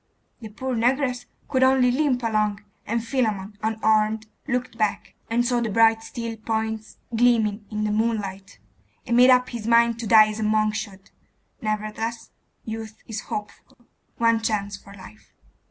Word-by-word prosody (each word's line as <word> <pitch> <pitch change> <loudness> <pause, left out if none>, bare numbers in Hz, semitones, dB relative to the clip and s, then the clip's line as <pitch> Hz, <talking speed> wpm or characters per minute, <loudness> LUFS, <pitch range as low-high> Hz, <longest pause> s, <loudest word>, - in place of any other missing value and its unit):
The 220 - -8
poor 255 +4 -4
negress 250 +2 0 0.2
could 260 -2 0
only 260 -1 +4
limp 255 -2 +1
along, 215 -2 0 0.3
and 230 +1 -1
Philammon, 215 -5 -1
unarmed, 220 0 +1 0.2
looked 250 -2 -2
back, 215 -2 -1 0.2
and 240 +1 +1
saw 245 -1 +1
the 230 - -1
bright 225 +1 +4
steel 230 0 -6
points 220 -1 -3 0.2
gleaming 225 -3 +2
in 215 -1 -3
the 210 - 0
moonlight, 210 - -2 0.5
and 235 - 0
made 250 +1 +7
up 250 0 +5
his 230 -3 -6
mind 235 0 +4
to 230 - -4
die 215 0 +7
as 215 +1 -5
a - - -1
monk 215 0 +2
should. 200 -3 -7 0.5
Nevertheless, 215 +1 -3 0.3
youth 220 -1 -6
is 220 -2 -5
hopeful. 210 +5 -7 0.4
One 230 -1 +3
chance 205 -2 -1
for 200 0 -14
life. 105 - -15
225 Hz, 155 wpm, -24 LUFS, 215-235 Hz, 0.5 s, made